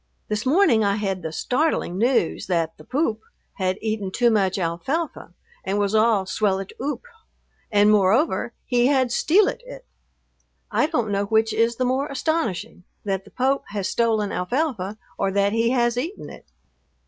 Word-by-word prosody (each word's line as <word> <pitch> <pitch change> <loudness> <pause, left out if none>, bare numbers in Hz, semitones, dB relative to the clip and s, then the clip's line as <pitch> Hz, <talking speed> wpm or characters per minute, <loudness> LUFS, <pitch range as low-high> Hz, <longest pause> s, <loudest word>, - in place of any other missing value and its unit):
This 210 +3 -2
morning 270 - +4
I 200 -1 +2
had 195 -3 -2
the 160 -2 -5
startling 250 - -1
news 235 -9 +1
that 165 -3 0
the - - -13
"Poop" 255 -6 -1 0.4
had 185 -1 0
eaten 215 -3 -2
too 240 +5 +2
much 195 -3 +1
alfalfa 190 - -3 0.3
and 195 +1 -1
was 205 0 0
all 215 -3 +3
"swellit 195 0 -1
oop," 290 - -3 0.7
and, 205 0 +5
moreover, 210 - +2
he 245 -1 +2
had 265 -3 +2
"stealit 385 - +2
it." - - -11 0.9
I 300 - +2
don't 240 -10 -1
know 200 0 0
which 220 +1 +2
is 230 +1 +2
the 255 - -1
more 260 +3 0
astonishing, 275 - -2 0.2
that 195 -1 -2
the - - -14
Pope 265 +2 0
has 200 -2 -3
stolen 220 -3 +1
alfalfa, 215 - -2 0.2
or - - +1
that 200 +1 +2
he 230 +1 +2
has 240 -1 +2
eaten 320 +11 -4
it. - - -14
220 Hz, 160 wpm, -23 LUFS, 195-260 Hz, 0.9 s, and